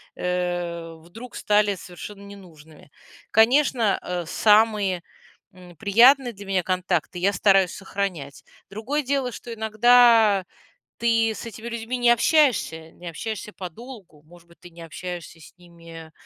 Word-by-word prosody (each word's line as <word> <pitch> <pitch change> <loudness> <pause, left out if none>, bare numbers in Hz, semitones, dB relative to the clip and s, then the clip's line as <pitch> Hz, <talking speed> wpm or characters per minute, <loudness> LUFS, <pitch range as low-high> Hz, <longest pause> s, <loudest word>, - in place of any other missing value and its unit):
э, 175 -2 -3
вдруг 175 +10 -13
стали 210 -1 +1
совершенно 185 +3 -11
ненужными. 160 -7 -15 0.4
Конечно, 230 -2 +3
э, 180 -1 -4
самые, 210 -2 +2 0.5
м, 180 -1 -15
приятные 240 - +4
для 200 0 -12
меня 190 -2 -1
контакты 180 -1 -2
я 195 +3 +2
стараюсь 195 -1 +3
сохранять. 190 -8 -5 0.3
Другое 250 +9 -3
дело, 270 -1 -1
что 235 +1 -9
иногда 220 -2 +4 0.5
ты 225 -1 +1
с 220 - -8
этими 230 0 -9
людьми 235 +1 -4
не 245 -1 +3
общаешься, 235 - +1
не 175 - -12
общаешься 210 +5 -6
подолгу. 190 - -11
Может 170 +2 -19
быть, 170 - -22
ты 175 - -13
не 170 0 -14
общаешься 170 +1 -8
с - - -15
ними, 165 -2 -14
195 Hz, 135 wpm, -23 LUFS, 175-225 Hz, 0.5 s, приятные